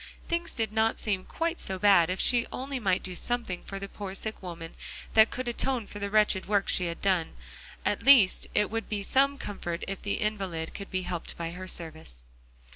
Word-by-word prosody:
Things 340 0 -1
did 220 -2 -1
not 220 +1 +2
seem 195 -4 -1
quite 335 +1 -2
so 190 - -1
bad 190 -4 +5
if 185 - -2
she 240 -1 +3
only 270 +1 -4
might 195 -4 +1
do 185 - -3
something 230 -2 -2
for 195 - -7
the 195 0 -5
poor 195 -1 -7
sick 220 +2 -4
woman 170 -3 -7 0.4
that 220 0 +7
could 255 0 -4
atone 240 0 0
for 205 - -8
the 200 0 -2
wretched 210 -2 +3
work 205 -1 +2
she 180 - +2
had 170 - -6
done; 185 -4 +1 0.5
at - - +1
least 250 -9 +6
it 210 -1 +3
would 225 0 -3
be 205 -2 -2
some 275 +6 +3
comfort 175 -6 -4
if 195 -1 -4
the 200 - -1
invalid 195 -7 -2
could 200 - -7
be 185 0 -1
helped 175 -2 -5
by 170 -1 -3
her 185 +2 -7
service. 160 - -5
200 Hz, 205 wpm, -29 LUFS, 185-225 Hz, 0.5 s, that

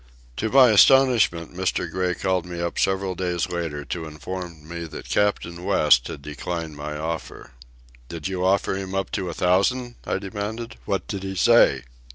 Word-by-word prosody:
To 110 - -1
my 130 -1 +7
astonishment 110 -8 +5
Mr. 90 -1 -1
Gray 90 +1 -1
called 95 -2 0
me 85 -1 -6
up 85 0 -2
several 95 0 +1
days 90 -1 -2
later 80 -4 -4
to 80 +3 -4
inform 80 +1 -7
me 85 0 -6
that 80 - -9
Captain 90 -4 0
West 60 -8 +4
had 70 - -8
declined 80 +2 -5
my 75 +1 -5
offer. 80 -3 -5 0.6
"Did 85 -1 -5
you 95 -1 -3
offer 95 +1 +2
him 95 0 -5
up 95 - -2
to 95 -3 -2
a 85 - -6
thousand?" 120 +7 +1
I - - -1
demanded. 105 +4 -5
"What 95 -3 -2
did 100 -2 -4
he 95 0 -5
say?" 95 - +5
90 Hz, 175 wpm, -24 LUFS, 85-100 Hz, 0.6 s, my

